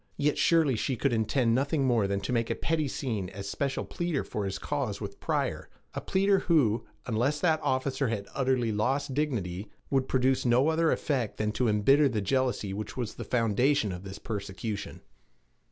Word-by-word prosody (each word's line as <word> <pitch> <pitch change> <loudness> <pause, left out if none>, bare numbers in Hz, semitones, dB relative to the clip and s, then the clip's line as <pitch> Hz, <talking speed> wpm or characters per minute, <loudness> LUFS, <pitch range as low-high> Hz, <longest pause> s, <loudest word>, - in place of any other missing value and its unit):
Yet 145 0 +1
surely 160 -6 +4
she 125 +4 -1
could 135 +1 0
intend 115 +2 +2
nothing 140 +3 +1
more 115 -6 +3
than 100 0 -1
to 110 - -2
make 115 -1 0
a - - 0
pretty 160 -2 0
scene 110 -9 -3
as 100 0 -7
special 135 +6 -2
pleader 175 -5 -2
for 105 - -4
his 95 - -3
cause 135 -9 -2
with 100 -2 -7
Pryor - - -2 0.2
a - - -4
pleader 195 +1 +2
who, 120 -10 +2 0.2
unless 125 +6 0
that 160 -3 +2
officer 130 0 0
had 105 -3 -3
utterly 130 -4 +1
lost 130 +7 0
dignity, 105 -10 -2 0.2
would 135 -1 +2
produce 130 0 +2
no 125 +5 +4
other 160 0 +2
effect 130 -8 -1
than 105 0 0
to 125 +3 0
embitter 135 +8 +4
the 110 -4 -1
jealousy 120 -2 0
which 105 +4 -6
was 120 -4 -3
the - - -7
foundation 115 +1 +2
of 90 0 -6
this 95 0 -7
persecution. 105 0 -5
125 Hz, 185 wpm, -29 LUFS, 105-140 Hz, 0.2 s, surely